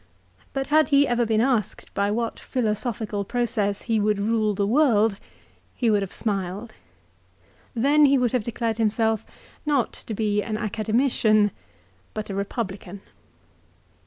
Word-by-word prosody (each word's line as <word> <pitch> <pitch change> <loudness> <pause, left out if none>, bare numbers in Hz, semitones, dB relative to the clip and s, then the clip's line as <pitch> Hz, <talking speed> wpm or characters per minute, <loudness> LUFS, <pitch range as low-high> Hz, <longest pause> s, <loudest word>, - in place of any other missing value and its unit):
But 270 0 -2
had 310 0 +5
he 285 -1 +5
ever 240 -1 +1
been 220 0 +2
asked 240 -5 -1
by 200 0 +1
what 230 +2 -2
philosophical 215 -3 -2
process 215 -3 -1
he 225 -2 +1
would 210 0 +1
rule 215 0 +1
the 200 - +1
world, 225 -4 +3 0.6
he 235 -3 +1
would 205 -1 +3
have 195 - -4
smiled. 200 +1 -3 1.0
Then 285 +5 +4
he 275 0 +4
would 245 -3 +1
have 250 - +1
declared 230 0 -2
himself 220 0 +1 0.4
not 285 -6 +1
to 220 - -7
be 210 -1 +1
an 215 0 -3
Academician, 215 -1 +2 0.6
but 215 -1 -4
a - - -4
Eepublican. 200 -1 -4
220 Hz, 140 wpm, -24 LUFS, 205-240 Hz, 1.0 s, had